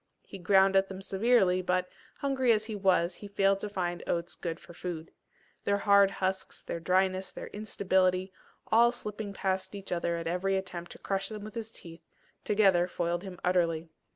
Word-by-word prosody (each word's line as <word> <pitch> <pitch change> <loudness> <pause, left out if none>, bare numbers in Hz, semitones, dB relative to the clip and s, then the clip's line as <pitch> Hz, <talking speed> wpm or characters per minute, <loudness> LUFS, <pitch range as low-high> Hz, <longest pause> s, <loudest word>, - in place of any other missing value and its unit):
He 195 - -10
ground 190 +2 +4
at 195 0 +4
them 190 -1 -7
severely, 195 -3 +3
but, 180 0 0 0.3
hungry 265 -3 +2
as 215 -1 +2
he 220 -1 -5
was, 185 -3 +2
he 205 - -10
failed 195 -1 +2
to 210 - -4
find 175 -3 -2
oats 170 0 -1
good 165 -2 -5
for 175 - -14
food. 165 -2 -6 0.5
Their 200 0 +2
hard 200 -1 +5
husks, 190 -1 -3
their 170 - -4
dryness, 185 +2 +1
their - - -8
instability, 190 -3 0 0.4
all 235 +2 +6
slipping 210 -3 -5
past 190 0 -2
each 195 -1 -8
other 170 -1 0
at 165 - -5
every 185 +3 0
attempt 180 -2 -5
to - - -13
crush 195 -1 -2
them 215 -2 -7
with 215 0 -8
his 225 -1 -5
teeth, 165 -5 -10 0.4
together 195 -4 +4
foiled 175 -1 -2
him 185 -2 -9
utterly. 170 -2 +1
190 Hz, 180 wpm, -30 LUFS, 180-200 Hz, 0.5 s, all